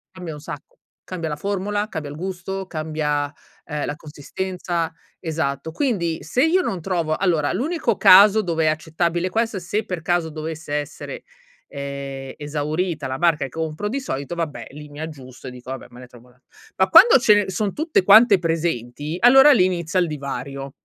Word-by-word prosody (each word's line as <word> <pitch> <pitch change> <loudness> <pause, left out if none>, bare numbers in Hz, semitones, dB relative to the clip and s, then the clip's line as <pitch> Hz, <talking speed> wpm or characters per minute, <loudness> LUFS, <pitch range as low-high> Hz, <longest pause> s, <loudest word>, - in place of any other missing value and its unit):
cambia 175 -4 -7
un 150 - -9
sacco. 150 -1 -10 0.3
Cambia 170 -3 -5
la 150 - -3
formula, 205 +4 -2
cambia 150 -6 -5
il 145 - -8
gusto, 190 +2 -5
cambia, 155 -3 -2 0.3
ehm, 150 -2 -3
la 145 - -4
consistenza 170 +3 -4 0.3
esatto. 160 -2 -3
Quindi 170 - -1
se 250 - +1
io 365 +3 +3
non 185 - -3
trovo 165 -4 -1
allora 165 -6 +1
l'unico 250 - -1
caso 205 +3 +7
dove 165 -4 -1
è - - +3
accettabile, 170 +3 -1
questo 225 -1 -1
se 205 +5 -3
per 180 -5 -4
caso 175 -1 0
dovesse 155 -1 -6
essere, 150 - -5 0.4
ehm, 140 -1 -6
esaurita 150 +1 -3
la 130 0 -4
marca 165 -5 +2
che - - -7
compro 160 +5 -4
di 275 +4 -2
solito, 140 - -5
vabbè 150 -9 -4
lì 150 +1 -10
mi 145 +1 -11
aggiusto 135 -5 -9
e - - -6
dico: 125 0 -12
"Vabbè 135 - -7
me 120 - -14
ne 125 - -11
trovo 125 0 -18
un'a" 125 +1 -27 0.4
Ma 190 0 +3
quando 390 - +8
ce 205 -4 +4
son 200 +2 -2
tutte 310 - +1
quante 205 0 +7
presenti, 155 -3 -2
allora 270 +4 +8
lì 185 -9 +5
inizia 175 -1 -1
il 175 - +2
divario. 140 -2 -6
165 Hz, 180 wpm, -22 LUFS, 145-190 Hz, 0.4 s, quando